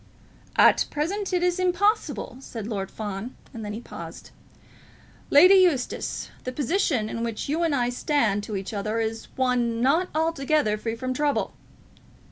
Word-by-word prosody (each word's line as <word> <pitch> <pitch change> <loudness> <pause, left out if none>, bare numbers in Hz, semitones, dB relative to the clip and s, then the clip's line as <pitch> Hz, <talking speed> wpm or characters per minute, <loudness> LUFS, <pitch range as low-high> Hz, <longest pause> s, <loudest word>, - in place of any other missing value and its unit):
"At - - +5
present 385 +8 -2
it 360 -1 +1
is 360 0 +1
impossible," 370 - +1
said 230 -5 -7
Lord 200 -3 -3
Fawn; 210 +3 -6 0.2
and 225 -3 -7
then 210 0 -4
he 215 - -5
paused. - - -10 1.0
"Lady 360 +7 +8
Eustace, 355 -10 +2
the 255 - -3
position 285 - 0
in 230 +1 -4
which 230 -2 -3
you 310 +4 0
and 325 -4 +2
I 245 -2 +1
stand 245 -5 +1
to 210 - -5
each 195 +2 -4
other 215 +2 -2
is 225 0 -3
one 245 -3 +1
not 315 +9 +2
altogether 310 -7 +1
free 225 +1 -3
from 255 +2 -3
trouble." 290 +2 0
255 Hz, 155 wpm, -25 LUFS, 225-325 Hz, 1.0 s, Lady